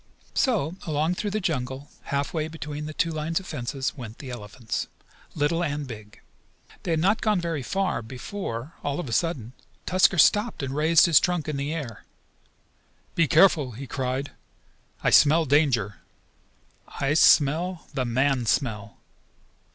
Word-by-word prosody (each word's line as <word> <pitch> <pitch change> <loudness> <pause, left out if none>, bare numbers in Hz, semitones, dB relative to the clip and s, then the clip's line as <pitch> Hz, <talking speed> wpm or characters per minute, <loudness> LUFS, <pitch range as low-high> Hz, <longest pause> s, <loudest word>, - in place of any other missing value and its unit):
So 190 - +1
along 155 +2 +1
through 205 +3 -3
the 215 +2 -1
jungle, 135 -6 -3
half 140 0 -2
way 155 -2 -1
between 150 -2 -6
the 155 - -6
two 165 - +1
lines 155 +2 -1
of 190 - -12
fence, 130 -2 -3
went 120 -5 -9
the 135 -4 -8
elephants, 115 0 -5 0.5
little 165 +3 +1
and 145 -2 -2
big. 105 -4 -11 0.6
They - - -6
had 165 -1 +2
not 195 +7 +2
gone 210 -4 +2
very 165 -4 -2
far 190 -3 -1
before, 130 - -6
all 145 +1 -2
of 175 - -4
a - - -6
sudden, 130 -6 -1 0.3
Tusker 185 0 +3
stopped 205 +2 +3
and 135 0 -3
raised 160 +2 +5
his 165 -4 +6
trunk 175 -4 -1
in 155 - -2
the 140 +2 -2
air. 140 -9 -5 1.1
"Be 165 -2 +2
careful!" 155 -6 +4
he 135 +5 -7
cried. 130 +1 -3 0.7
"I - - +3
smell 155 +2 +6
danger! 130 - +2 0.9
I 140 +1 -1
smell 160 +3 +4
the 135 -2 -1
man 130 0 +1
smell! 105 -5 -1
145 Hz, 155 wpm, -25 LUFS, 130-165 Hz, 1.1 s, his